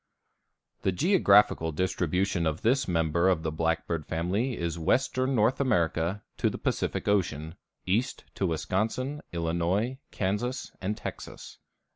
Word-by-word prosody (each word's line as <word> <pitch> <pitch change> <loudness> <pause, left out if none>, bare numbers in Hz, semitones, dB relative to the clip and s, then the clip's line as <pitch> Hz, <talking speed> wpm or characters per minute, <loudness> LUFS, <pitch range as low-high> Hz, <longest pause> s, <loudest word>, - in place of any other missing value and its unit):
_) - - -40
The 95 - +1
geographical 105 - +4
distribution 90 +1 0
of 80 0 -2
this 130 +3 +2
member 85 +1 +2
of 85 -4 +1
the 80 - -1
blackbird 80 0 -1
family 100 +10 -1
is 85 -1 -3
western 130 - +1
North 115 +5 +2
America 90 -5 +1
to - - +2
the - - -5
Pacific - - -2
Ocean, 85 -6 0 0.3
east 110 +8 0
to 95 - -1
Wisconsin, 110 - -1
Illinois, 85 +9 -1
Kansas, 105 +7 -2
and 105 +3 -2
Texas. - - -8
95 Hz, 130 wpm, -28 LUFS, 85-115 Hz, 0.3 s, geographical